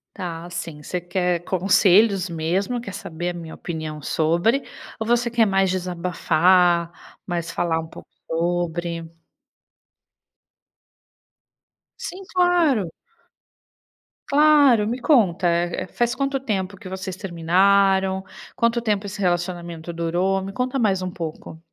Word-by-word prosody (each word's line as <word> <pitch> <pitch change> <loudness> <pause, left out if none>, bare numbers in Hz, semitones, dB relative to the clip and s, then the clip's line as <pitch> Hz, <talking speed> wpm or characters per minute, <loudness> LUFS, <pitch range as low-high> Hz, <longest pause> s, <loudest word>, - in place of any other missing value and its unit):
Tá, 170 -4 -5
assim, 170 -3 -6
você 180 +4 -3
quer 175 -1 -1
conselhos 190 +1 +3
mesmo. 180 +9 -1
Quer 200 -5 -8
saber 175 -2 -5
a - - -3
minha 165 -2 -8
opinião 155 -3 -6
sobre 170 - +1 0.4
ou 220 - -2
você 240 0 +2
quer 230 -1 +3
mais 195 -2 +2
desabafar, 175 -1 +2 0.3
mais 170 -2 -3
falar 170 -2 0
um 160 - -6
pouco - - -13 0.2
sobre? 170 0 -2 2.9
Sim, 380 +2 -7
claro. 345 - +3 1.4
Claro, 285 -7 +5
me 240 +3 -2
conta, 195 - +3
eh 170 +1 -1
eh, - - -16
faz 240 +5 0
quanto 275 0 -1
tempo 200 -6 -3
que 185 - -11
vocês 190 0 -5
terminaram? 190 +2 +2 0.3
Quanto 235 0 +2
tempo 210 -3 -1
esse 200 +1 -7
relacionamento 175 -2 -2
durou? 175 +3 0
Me 195 +1 -6
conta 255 +3 -1
mais 200 -6 +1
um 185 - -3
pouco. 165 -2 -7
185 Hz, 125 wpm, -22 LUFS, 170-210 Hz, 2.9 s, Claro